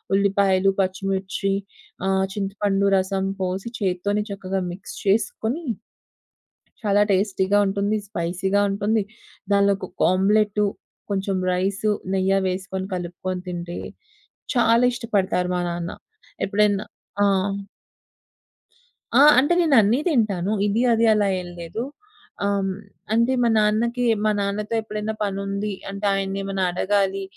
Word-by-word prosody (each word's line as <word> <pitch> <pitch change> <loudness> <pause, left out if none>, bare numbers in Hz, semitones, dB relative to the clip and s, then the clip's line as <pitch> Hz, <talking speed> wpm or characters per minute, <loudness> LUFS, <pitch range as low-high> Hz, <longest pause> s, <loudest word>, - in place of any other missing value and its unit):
ఉల్లిపాయలు, 195 -1 +3
పచ్చిమిర్చి, 195 +1 -1 0.6
ఆహ్, 190 0 +2
చింతపండు 200 0 0
రసం 190 0 0 0.2
పోసి 190 +5 -2
చేత్తోనే 200 +1 0
చక్కగా 195 -1 -3
మిక్స్ 185 - -9
చేసుకొని, 220 +8 0 1.2
చాలా 205 0 +4
టేస్టీగా 195 0 +1
ఉంటుంది. 200 +2 0
స్పైసీగా 190 +3 0
ఉంటుంది. 205 +2 +1 0.5
దానిలో 200 0 +4
కొక - - -9 0.2
ఆమ్లెట్టు 210 +2 +2 0.5
కొంచెం 195 -1 -1 0.2
రైసు, 195 +3 0 0.2
నెయ్య 190 0 +2 0.2
వేసుకొని 190 +1 -4
కలుపుకొని 180 +1 -4
తింటే, 175 0 -5 0.8
చాలా 235 0 +4
ఇష్టపడతారు 195 -6 0
మా 180 - 0
నాన్న. 170 0 -4 0.5
ఎప్పుడైనా 205 0 +2 0.4
ఆ! - - +5 1.9
ఆ! - - +7 0.2
అంటే 290 +6 +3
నేను 310 -5 +3
అన్నీ 220 +6 +2
తింటాను 210 - +1
ఇది, 210 +3 +1
అది 230 0 +3
అలా 210 -1 +2
ఏం 180 - -9
లేదు. 170 +8 -4 0.6
ఆహ్, 200 0 +1
హ్మ్. 195 -1 -1 0.4
అంటే 235 +3 +3
మా 235 - +3
నాన్నకి 230 +4 +1 0.2
మా 215 - +3
నాన్నతో 205 +2 -2
ఎప్పుడైనా 215 0 -4
పనుంది 200 +1 -2 0.2
అంటే, 200 +1 -5
ఆయన్ని 195 0 -2
ఏమైనా 195 -1 -1
అడగాలి 195 +1 0
200 Hz, 115 wpm, -23 LUFS, 190-210 Hz, 1.9 s, ఆ